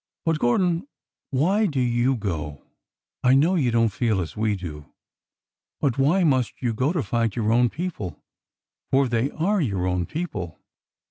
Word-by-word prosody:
" - - -65
But, 165 -2 +1
Gordon, 170 - +1 0.4
why 190 +11 +2
do 140 -6 -2
you 125 +1 +2
go? 80 - -4 0.6
I 125 +1 +5
know 155 +7 +4
you 145 -9 +2
don't 115 -1 +3
feel 110 -5 +1
as 85 -3 -4
we 110 -1 0
do, 75 -6 -8 0.9
but 140 -4 0
why 165 +8 +3
must 130 -7 +1
you 120 -3 -1
go 130 +7 +1
to 170 -6 -1
fight 115 -3 -1
your 110 -2 0
own 120 0 +4
people? 130 - -5 0.7
For 135 0 +3
they 120 +2 0
are 190 +6 0
your 100 - -1
own 90 -1 0
people 95 - -5
125 Hz, 165 wpm, -24 LUFS, 105-155 Hz, 0.9 s, I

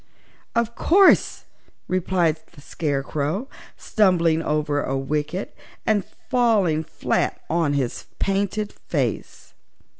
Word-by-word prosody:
"Of 235 0 +1
course," 380 +9 +4 0.4
replied 175 -3 +1
the 145 - -14
Scarecrow, 150 - -2 0.3
stumbling 170 -6 +2
over 150 -2 0
a 135 0 -2
wicket 150 +7 -3 0.3
and 210 -3 +2
falling 210 - +1
flat - - -1
on 165 -3 +1
his 135 -4 -2
painted 200 +1 -1
face. - - -4
170 Hz, 95 wpm, -23 LUFS, 150-205 Hz, 0.4 s, course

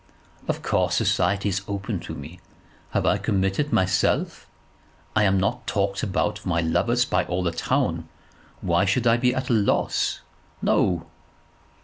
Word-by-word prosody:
"Of - - -2
course - - +1
society 100 +3 +1
is 95 +1 -1
open 100 0 -3
to 80 -1 -7
me. 80 +5 -9 0.5
Have - - 0
I - - +3
committed 100 +7 0
myself? 95 0 +1 0.7
I 105 -1 +4
am 95 -1 +3
not 100 - -1
talked 100 -1 0
about 105 +1 -1
for 100 - -6
my 85 -1 +1
lovers 120 +9 +2
by 90 -7 +1
all 90 +1 -2
the 85 - 0
town. 85 - -1 0.5
Why 85 -1 +2
should 100 +6 +1
I 115 0 +5
be 125 +1 +2
at 130 -1 -2
a - - +4
loss? 105 -3 +1 0.4
No." 85 -3 +1
95 Hz, 155 wpm, -24 LUFS, 90-105 Hz, 0.7 s, I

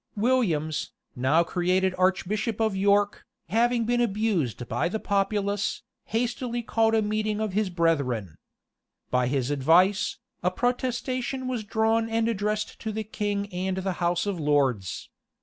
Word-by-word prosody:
[] - - -42
Williams, 205 -10 0 0.2
now 135 +7 +3
created 185 +2 +1
archbishop 190 +4 0
of 220 -3 +1
York, 200 +1 +2 0.3
having 235 +3 +2
been 240 +1 +1
abused 195 - 0
by 120 +9 0
the 220 - -2
populace, 200 0 0 0.2
hastily 240 +1 -2
called 225 0 +2
a 220 - +3
meeting 215 0 -1
of 215 -3 -2
his 210 -1 +1
brethren. 140 - 0 0.8
By 125 -1 +2
his 135 0 0
advice, 170 +8 +3 0.2
a 180 - +2
protestation 255 +3 -2
was 245 -4 -2
drawn 225 +2 +1
and 225 0 +1
addressed 210 -1 -2
to 220 - -4
the 220 +1 -3
king 205 -1 -2
and 185 +1 -2
the 190 0 -1
house 175 +1 +1
of 200 -4 -2
lords. 135 - 0
200 Hz, 145 wpm, -26 LUFS, 170-225 Hz, 0.8 s, now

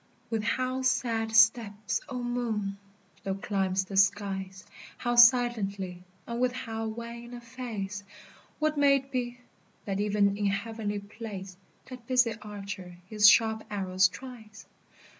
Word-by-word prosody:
With 225 -1 0
how 255 +4 -1
sad 230 -3 0
steps, 220 -2 +3
O 250 -2 -4
Moon! 220 -5 -2 0.4
thou 195 -2 -2
climb'st 190 -1 -1
the 195 - -6
skies, 195 -1 +1 0.3
How 240 -1 -1
silently, 215 -7 +4 0.2
and 235 +1 -4
with 250 -1 +2
how 225 -3 -4
wan 235 +2 -7
a - - -7
face! 230 -5 -6 0.5
What 310 -1 0
may 280 -1 +6
it 270 0 -4
be, 245 -1 -2 0.5
that 195 -1 -2
even 205 -1 +2
in 205 -1 0
heavenly 205 +1 -2
place 200 -2 -8 0.3
That 250 -2 -11
busy 250 -3 +3
Archer 195 -4 -7
his 210 -1 +7
sharp 220 0 +3
arrows 190 -2 +2
tries? 220 -1 -11
220 Hz, 135 wpm, -29 LUFS, 200-240 Hz, 0.5 s, his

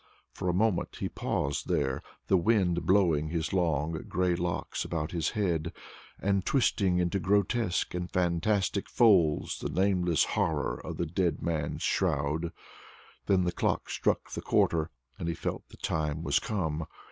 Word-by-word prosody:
For 90 - -2
a - - +4
moment 100 +1 +1
he - - -2
paused 70 0 -2
there, 65 0 0 0.2
the - - +3
wind 90 -3 +2
blowing 85 -6 +3
his 80 +1 -2
long 80 -4 +1 0.2
gray 90 0 +1
locks 85 0 -2
about 80 -2 -3
his 85 -3 0
head, 85 -5 0 0.5
and 100 -1 +1
twisting 100 -9 +2
into 90 +2 +1
grotesque 100 +1 +1
and 90 0 -3
fantastic 95 +3 0
folds 95 -10 +3
the - - -3
nameless 90 -4 +2
horror 75 -6 0
of - - -6
the 85 - 0
dead 85 +1 -1
man's 80 -4 -2
shroud. 75 +4 0 0.8
Then 95 -2 +3
the 90 - 0
clock - - -1
struck - - 0
the - - -4
quarter, 80 -1 +2 0.3
and 85 - -3
he 85 - -1
felt - - -4
the - - -14
time 80 0 -2
was - - +2
come. 80 -7 -2
85 Hz, 155 wpm, -29 LUFS, 80-95 Hz, 0.8 s, a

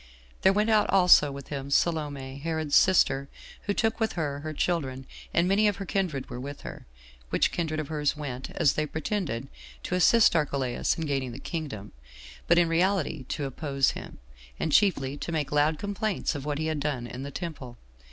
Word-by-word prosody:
There 190 - +6
went 210 +3 +2
out 215 -1 +3
also 180 -6 +6
with 140 0 -9
him 140 -1 -5
Salome, 140 -4 0
Herod's 160 -1 -1
sister 140 -7 +4 0.4
who 205 - +2
took 225 0 0
with 220 -1 0
her, 145 -4 -2
her 155 +2 -5
children, 140 -5 -2 0.3
and 170 +1 +2
many 205 +3 +4
of 205 - +1
her 195 - -6
kindred 175 -9 -2
were 125 - -7
with 140 +2 -7
her; - - -9 0.4
which - - +2
kindred 160 -2 -2
of 155 - -4
hers 150 -1 0
went, 135 -3 -5
as 145 - +3
they 155 0 -1
pretended, 155 - -3 0.4
to - - -4
assist 195 +3 +5
Archelaus 140 -5 0
in 165 - -2
gaining 135 -4 -2
the - - -7
kingdom, 140 - -5 0.6
but 170 - +5
in 175 -1 +5
reality 165 -4 +1
to 145 +2 -3
oppose 135 0 0
him, - - -9 0.4
and 160 - -1
chiefly 145 -8 +2
to 170 - -5
make 155 -3 -2
loud 150 +1 +2
complaints 205 -1 -2
of 145 -2 -6
what 145 -1 -2
he 155 - -2
had 155 -1 -1
done 140 -4 -2
in 125 +2 -7
the 140 - -5
temple. 140 -7 -7
150 Hz, 190 wpm, -27 LUFS, 140-175 Hz, 0.6 s, There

